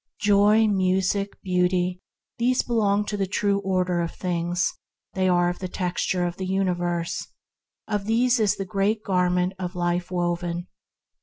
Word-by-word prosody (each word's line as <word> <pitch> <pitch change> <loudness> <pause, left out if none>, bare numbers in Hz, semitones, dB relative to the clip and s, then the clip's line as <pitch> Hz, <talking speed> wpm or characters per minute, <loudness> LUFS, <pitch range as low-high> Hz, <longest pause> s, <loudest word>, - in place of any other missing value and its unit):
Joy, 205 +1 +5
Music, 190 0 0
Beauty: 180 0 +1 0.4
these 250 +2 +2
belong 210 -3 +1
to 210 - -3
the 195 -2 -1
True 200 +1 +1
Order 185 -2 0
of 170 - -4
things; 175 0 -1 0.4
they 185 -1 +1
are 175 -1 +3
of 175 - -2
the 185 - -4
texture 180 0 -1
of 175 +1 -3
the 190 - -4
universe; 175 -3 -1 0.6
of 210 -2 -2
these 240 +3 +2
is 210 -3 +2
the 195 - -4
divine 200 +3 +1
Garment 180 -1 +1
of 180 0 -4
Life 175 0 -1
woven. 175 -1 -2
185 Hz, 150 wpm, -24 LUFS, 175-200 Hz, 0.6 s, Joy